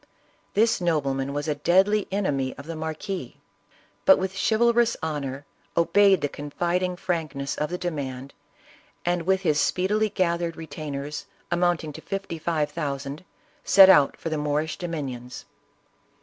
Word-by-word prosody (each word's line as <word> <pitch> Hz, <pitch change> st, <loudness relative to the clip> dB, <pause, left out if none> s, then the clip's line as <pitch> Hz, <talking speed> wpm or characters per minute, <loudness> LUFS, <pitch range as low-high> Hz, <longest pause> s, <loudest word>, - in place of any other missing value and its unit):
This 225 Hz, 0 st, +3 dB
nobleman 140 Hz, -5 st, 0 dB
was 145 Hz, +2 st, -3 dB
a 150 Hz, -, +1 dB
deadly 190 Hz, +7 st, +3 dB
enemy 145 Hz, -10 st, -1 dB
of 140 Hz, -, -9 dB
the 165 Hz, +1 st, -6 dB
marquis, 160 Hz, -, -5 dB, 0.7 s
but -, -, +7 dB
with 190 Hz, 0 st, -2 dB
a 195 Hz, -, 0 dB
chivalrous 235 Hz, +1 st, +3 dB
honor, 145 Hz, -3 st, -3 dB, 0.3 s
obeyed 195 Hz, +1 st, +4 dB
the 145 Hz, -, +1 dB
cqpfidiug 175 Hz, +6 st, -2 dB
frankness 155 Hz, -7 st, -3 dB
of 150 Hz, -, -1 dB
the 180 Hz, -, -3 dB
demand, 140 Hz, -6 st, -5 dB, 0.7 s
and, 175 Hz, -1 st, 0 dB
with 190 Hz, 0 st, +3 dB
his 155 Hz, -5 st, +2 dB
speedily 210 Hz, +4 st, +1 dB
gathered 170 Hz, -3 st, -1 dB
retainers, 150 Hz, -2 st, -6 dB, 0.2 s
amounting 175 Hz, -3 st, +1 dB
to -, -, -9 dB
fifty 195 Hz, -4 st, -5 dB
five 155 Hz, -2 st, -1 dB
thousand, 140 Hz, -1 st, -4 dB, 0.4 s
set 195 Hz, -1 st, +8 dB
out 145 Hz, -5 st, +4 dB
for 165 Hz, -, -4 dB
the 155 Hz, -1 st, -2 dB
Moorish 150 Hz, +1 st, -1 dB
dominions. 135 Hz, -8 st, -5 dB
160 Hz, 140 wpm, -25 LUFS, 145-185 Hz, 0.7 s, set